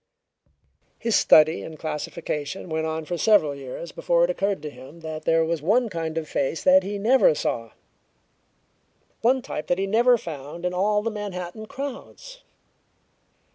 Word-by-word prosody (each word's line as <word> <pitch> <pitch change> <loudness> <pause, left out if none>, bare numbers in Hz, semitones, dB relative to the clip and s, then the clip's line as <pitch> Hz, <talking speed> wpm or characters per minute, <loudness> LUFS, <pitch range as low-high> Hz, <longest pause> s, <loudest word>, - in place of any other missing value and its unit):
His 230 -1 0
study 155 +1 +5
and 160 -1 -8
classification 155 +2 -4
went 160 0 -1
on 160 0 -3
for 175 +1 -4
several 205 -10 +4
years 140 +4 -8
before 170 0 +1
it 175 - +2
occurred 195 +1 -1
to 150 - -5
him 135 +6 -13
that 160 -1 -6
there 165 0 +3
was 165 -1 -2
one 225 +9 +2
kind 165 -3 -4
of 160 -1 -3
face 140 +3 -2
that 280 0 +6
he 205 -3 -4
never 265 - +4
saw - - -3 1.5
one 255 +2 +3
type 155 - -5
that 175 - +1
he 195 - 0
never 235 +5 +4
found 160 -2 -7
in 180 - -1
all 210 +3 +1
the 230 - -1
Manhattan 205 0 -6
crowds. 280 - -8
175 Hz, 160 wpm, -24 LUFS, 160-215 Hz, 1.5 s, that